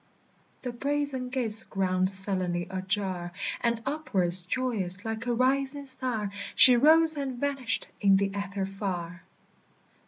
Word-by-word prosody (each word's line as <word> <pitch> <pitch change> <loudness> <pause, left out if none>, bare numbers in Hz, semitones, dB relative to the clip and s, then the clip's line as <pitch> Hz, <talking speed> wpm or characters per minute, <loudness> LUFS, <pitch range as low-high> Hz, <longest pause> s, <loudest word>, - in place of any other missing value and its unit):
The 250 - -3
brazen 275 0 -2
gates 225 -4 +4
ground 185 -1 0
sullenly 185 -3 +2
ajar, 190 -2 -3 0.3
And 235 -1 -1
upwards, 190 - +1
joyous, 195 -3 -3
like 225 +2 -5
a 240 - +1
rising 270 +3 0
star, 250 -6 -3 0.2
She 255 - +7
rose 315 +5 +5
and 275 -3 -4
vanished 275 -4 -2
in 195 -2 +4
the 195 0 -1
ether 200 -1 -3
far. 185 -3 -5
220 Hz, 125 wpm, -27 LUFS, 190-260 Hz, 0.3 s, She